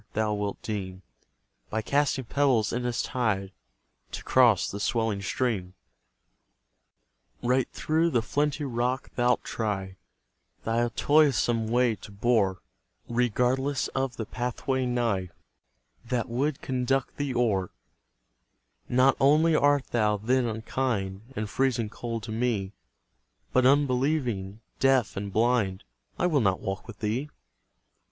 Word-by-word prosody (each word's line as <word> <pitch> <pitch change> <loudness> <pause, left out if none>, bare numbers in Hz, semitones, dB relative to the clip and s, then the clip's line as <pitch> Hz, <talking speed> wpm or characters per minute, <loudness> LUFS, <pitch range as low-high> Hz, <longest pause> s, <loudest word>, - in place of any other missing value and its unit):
thou 110 0 0
wilt 105 -1 -3
deem, 95 -3 -5 0.7
By 110 0 -2
casting 140 0 +1
pebbles 130 -4 +2
in 125 +1 -1
its 120 - -1
tide, 105 -6 -1 0.6
To - - -5
cross 120 -7 +4
the 100 - -5
swelling 110 -2 0
stream. 100 -4 -2 1.7
Right 125 +1 +2
through 160 +2 +1
the 120 -8 +1
flinty 145 +4 -1
rock 125 0 -2
thou'lt 125 0 +2
try 95 -4 -3 0.7
Thy 115 +1 +1
toilsome 135 -6 +3
way 120 +1 +2
to 100 - -12
bore, 100 -3 +1 0.5
Regardless 125 +3 +1
of 135 -2 -2
the 110 - -3
pathway 125 +2 -2
nigh 115 -7 0 0.8
That 120 -1 -1
would 135 +5 -1
conduct 130 0 -1
thee 145 -3 -2
o'er 105 -7 +1 1.2
Not 130 +2 +4
only 155 +4 +4
art 145 -2 +3
thou, 105 -3 +2
then, 120 +4 +1
unkind, 110 -2 -3
And 110 -1 -2
freezing 120 0 0
cold 115 -2 -5
to 110 - -6
me, 110 -4 -1 0.8
But 130 0 +5
unbelieving, 130 -7 +1 0.2
deaf, 135 -4 +3
and 100 0 -4
blind: 110 -3 +1 0.3
I - - +1
will 155 -6 +3
not 95 -3 +2
walk 95 +4 -5
with 115 -4 -11
thee! 115 +7 -1
120 Hz, 125 wpm, -27 LUFS, 105-130 Hz, 1.7 s, But